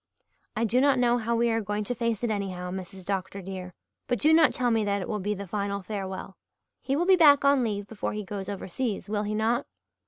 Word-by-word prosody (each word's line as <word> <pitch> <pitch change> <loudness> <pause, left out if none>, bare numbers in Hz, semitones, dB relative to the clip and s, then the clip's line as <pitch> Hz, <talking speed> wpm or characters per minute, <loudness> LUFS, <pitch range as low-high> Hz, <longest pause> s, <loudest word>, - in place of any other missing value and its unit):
"I 225 - 0
do 235 +3 +2
not 275 -1 +4
know 245 -1 +3
how 235 +1 -1
we 235 0 +2
are 225 0 +1
going 205 +1 -2
to 225 - -2
face 230 -2 -2
it 235 - +1
anyhow, 185 -3 -3
Mrs. 190 0 -7
Dr. 195 0 -3
dear. 185 -1 -7 0.4
But 245 - 0
do 310 +1 +4
not 320 -1 +6
tell 245 -2 0
me 225 -1 +2
that 200 -1 0
it 185 - -5
will 210 - -2
be 205 +2 -1
the 200 0 -6
final 200 0 -3
farewell. 190 -1 -5 0.4
He 270 - -1
will 340 +4 +1
be 380 0 +6
back 290 -5 +6
on 280 -2 +4
leave 205 -3 -2
before 210 0 -4
he 210 0 -4
goes 195 0 -5
overseas, 205 +1 -4
will 210 -1 0
he 210 0 -2
not?" 230 +4 0
210 Hz, 240 wpm, -27 LUFS, 195-240 Hz, 0.4 s, not